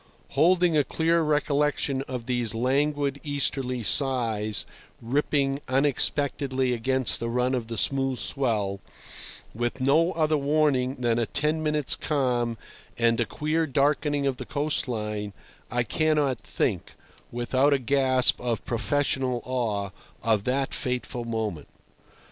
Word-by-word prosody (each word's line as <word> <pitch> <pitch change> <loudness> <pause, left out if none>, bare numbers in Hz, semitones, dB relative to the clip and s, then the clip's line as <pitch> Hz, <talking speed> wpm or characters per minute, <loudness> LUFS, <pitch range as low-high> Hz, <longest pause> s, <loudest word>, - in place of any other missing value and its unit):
Holding 170 +4 +3
a 150 - +4
clear 165 +4 +1
recollection 150 -2 0
of 125 -3 -5
these 120 -3 -1
languid 140 +3 0
easterly 135 -4 -1
sighs 115 -5 +2 0.3
rippling 140 +2 0
unexpectedly 135 -1 +1
against 130 +2 0
the 115 - -3
run 125 +2 0
of 120 -3 -2
the 115 -1 -5
smooth 135 +2 +1
swell, 105 -9 0 0.7
with 120 +3 -3
no 155 +7 +3
other 155 -2 +1
warning 140 -3 +1
than 120 -2 0
a 115 - 0
ten 150 +2 0
minutes' 150 -2 0
calm 125 -6 -1 0.4
and 115 0 +2
a 120 - +2
queer 160 +1 -1
darkening 145 +1 +1
of 135 -2 0
the - - -6
coast 145 -1 -1
line, 105 -3 -4 0.4
I 120 +1 0
cannot 145 +1 +1
think, - - -2 0.4
without 130 +4 +1
a 140 - +4
gasp 130 0 +3
of 120 -2 -2
professional 130 +1 0
awe, 110 -6 -2 0.3
of 110 -3 +1
that 135 +2 -1
fateful 125 -1 -3
moment. 110 -9 -3
130 Hz, 130 wpm, -26 LUFS, 120-145 Hz, 0.7 s, a